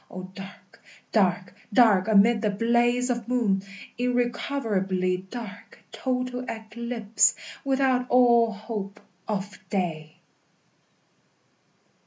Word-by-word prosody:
O 185 0 -7
dark, 195 0 -12 0.3
dark, 185 -3 +1 0.2
dark, 210 -4 +5
amid 220 +1 +5
the 215 - +1
blaze 240 +4 +2
of 240 -1 -3
moon, 225 -6 +1 0.4
Irrecoverably 230 -7 0
dark, 220 -4 -9
total 250 -1 -2
eclipse, 220 -2 0 0.3
Without 265 -2 +1
all 235 -2 +5
hope 205 -1 -6 0.3
of 205 -2 -4
day! 160 -5 -3
220 Hz, 90 wpm, -26 LUFS, 195-245 Hz, 0.4 s, dark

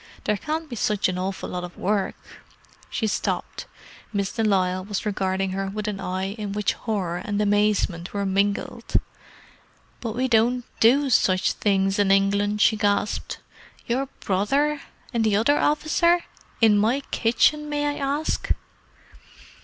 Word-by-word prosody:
There 210 - +1
can't 310 +8 -3
be 250 - -6
such 210 -2 +1
an 180 0 -3
awful 190 +1 -3
lot 180 0 -4
of 175 0 -9
work!" 200 0 0 0.7
She 225 - -2
stopped. 210 - -2 0.4
Miss 200 -2 -1
de 225 - -1
Lisle 185 -3 +1
was 205 +2 -4
regarding 190 -2 -1
her 195 +1 -2
with 210 +2 -4
an 205 -2 -3
eye 190 0 -2
in 205 -2 -4
which 210 -1 0
horror 190 -7 -2
and 205 +2 -3
amazement 205 -4 +1
were 200 -1 -2
mingled. 200 +1 0 1.0
"But 230 -2 -4
we 255 +2 +1
don't 240 +1 +2
do 270 +4 +4
such 185 -4 +3
things 195 -1 +1
in 200 -1 +3
England!" 200 +1 +2
she 220 - +4
gasped. 205 -1 -1 0.4
"Your 260 +3 -1
brother! 275 +10 +1 0.3
And 230 -1 +1
the 215 -2 +2
other 235 +8 +3
officer! 340 +3 +2 0.4
In 215 -2 +6
my 235 +7 +2
kitchen, 300 +6 +2
may 290 0 -1
I 290 0 -1
ask?" 285 +3 -1
210 Hz, 150 wpm, -24 LUFS, 195-240 Hz, 1.0 s, In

